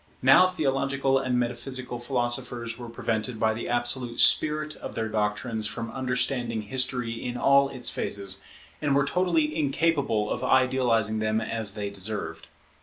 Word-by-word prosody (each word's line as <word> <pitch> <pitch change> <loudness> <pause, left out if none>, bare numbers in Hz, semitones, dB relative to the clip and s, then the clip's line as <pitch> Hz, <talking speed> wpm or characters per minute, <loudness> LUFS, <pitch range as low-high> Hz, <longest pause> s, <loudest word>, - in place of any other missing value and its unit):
Now 135 +8 +7
theological 135 -5 0
and 130 -2 -1
metaphysical 125 +1 -3
philosophers 120 -1 -2
were 120 -1 -7
prevented 115 0 -3
by 110 0 +2
the 110 - -5
absolute 120 0 0
spirit 155 0 +4
of - - -8
their 110 -1 -1
doctrines 110 +1 -1
from 115 +1 -5
understanding 125 -2 -1
history 125 0 -2
in 125 0 -4
all 140 +1 +4
its 125 -3 -2
phases, 100 -1 0 0.4
and 145 -2 +1
were 140 0 +3
totally 165 -2 +1
incapable 140 -7 0
of 125 - -3
idealizing 125 -5 +2
them 110 0 0
as 115 -2 -3
they 100 -1 -4
deserved. 100 +2 -4
125 Hz, 145 wpm, -26 LUFS, 110-135 Hz, 0.4 s, Now